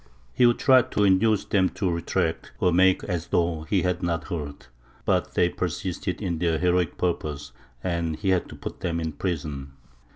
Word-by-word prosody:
He 125 - +5
would 120 - +3
try 130 -1 +6
to 105 - -1
induce 100 +2 +3
them 95 -2 +2
to 95 -3 0
retract, 85 -1 -2
or 90 - +2
make 95 +1 +4
as 90 -3 -3
though 85 -2 0
he 95 - +2
had 90 -1 0
not 85 -2 -2
heard. 75 -5 -5 0.4
But - - 0
they 90 - +4
persisted 90 0 -3
in 85 -4 -2
their 85 -2 +1
heroic 90 -1 +1
purpose, 75 -6 -2 0.3
and 85 -3 -1
he 95 +5 -2
had 90 -2 +1
to - - -9
put - - -7
them 85 -1 -2
in 80 -1 -2
prison. 75 -5 -4
90 Hz, 185 wpm, -25 LUFS, 80-95 Hz, 0.4 s, try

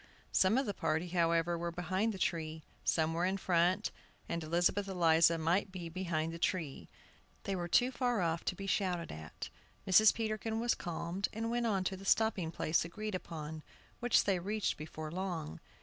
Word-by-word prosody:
Some 190 +5 +4
of 270 - +2
the 205 - -2
party, 165 0 -1
however, 170 -1 +2
were 170 0 -2
behind 185 +6 0
the 200 - -6
tree, 160 -3 -2 0.2
some 160 0 +2
were 170 +1 0
in 190 +2 +1
front, 185 +2 +2 0.4
and 170 -1 -2
Elizabeth 175 +5 +1
Eliza 170 -3 +4
might 175 +5 +1
be 175 -3 -6
behind 165 -2 -2
the 165 - -7
tree. 165 -6 -2 0.5
They 195 - -2
were 175 -1 -2
too 245 +8 +4
far 245 -3 0
off 165 -2 0
to - - 0
be 195 - -6
shouted 185 -4 0
at. 80 0 -7 0.4
Mrs. 205 +3 +7
Peterkin 220 0 -2
was 240 +1 +2
calmed, 175 +3 -3
and 225 +1 -2
went 240 0 +1
on 195 -4 +1
to 190 - -1
the 190 - -11
stopping 195 -5 +2
lace 155 - +2
agreed 215 +5 -5
upon, 160 -3 -5 0.4
which 245 0 +4
they 195 -3 +1
reached 205 +4 -1
before 155 0 -7
long. 170 - -4
180 Hz, 180 wpm, -34 LUFS, 165-200 Hz, 0.5 s, Mrs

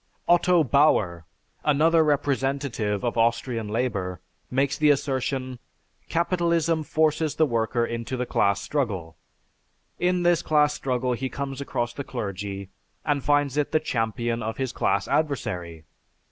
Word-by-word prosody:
Otto 175 0 +4
Bauer, 110 - +2 0.4
another 160 +3 +4
representative 135 -7 0
of 120 -1 -1
Austrian 115 -1 0
labor, 105 -6 -2 0.3
makes 135 +2 +1
the 150 -1 +3
assertion: 130 -2 -1 0.5
"Capitalism 170 -1 +1
forces 155 0 +1
the 160 - +4
worker 115 -2 0
into 115 +2 -4
the 125 - -1
class 100 -4 +2
struggle. 100 - -2 0.8
In 180 0 +1
this 175 -1 +3
class 150 -1 +3
struggle 125 -2 -1
he 130 +2 -3
comes 140 -1 -5
across 120 -3 -2
the 140 - -5
clergy 100 -5 -5 0.3
and 145 -3 0
finds 145 -1 +2
it 150 +1 0
the 155 - +4
champion 115 -3 -1
of 110 +1 -4
his 130 -2 -2
class 100 0 0
adversary. 90 - -2
130 Hz, 130 wpm, -25 LUFS, 115-150 Hz, 0.8 s, Otto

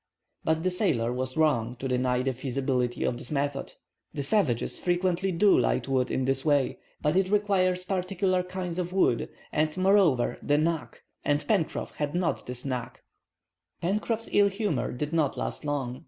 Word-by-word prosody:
But 160 0 +1
the 185 - +1
sailor 135 - +1
was 130 +2 -3
wrong 125 -7 +2
to 135 +2 -4
deny 125 0 +1
the 135 0 0
feasibility 130 -1 -1
of 120 - -1
this 125 - -5
method. 140 -1 -2 0.4
The 140 - -2
savages 140 - +1
frequently 180 +1 +1
do 190 +3 +5
light - - +1
wood 130 -2 +1
in 130 - 0
this 135 0 0
way. 145 -4 +2 0.2
But 150 +3 +2
it 190 0 +2
requires 190 -3 +2
particular 185 0 0
kinds 180 -1 -4
of 180 0 -3
wood, 155 -11 +2 0.2
and, 155 +2 0
moreover, 185 -10 +3
the 145 - +2
"knack," 160 +1 -1 0.2
and 145 0 +1
Pencroff 175 -2 -1
had 150 +1 -2
not 175 -1 -1
this 125 +1 -6
"knack." 125 -3 -4 0.8
Pencroff's 215 +5 -1
ill 205 0 +5
humor 200 - -1
did 150 +5 -4
not 155 -4 +1
last - - -3
long. 135 -4 -2
155 Hz, 170 wpm, -28 LUFS, 130-185 Hz, 0.8 s, do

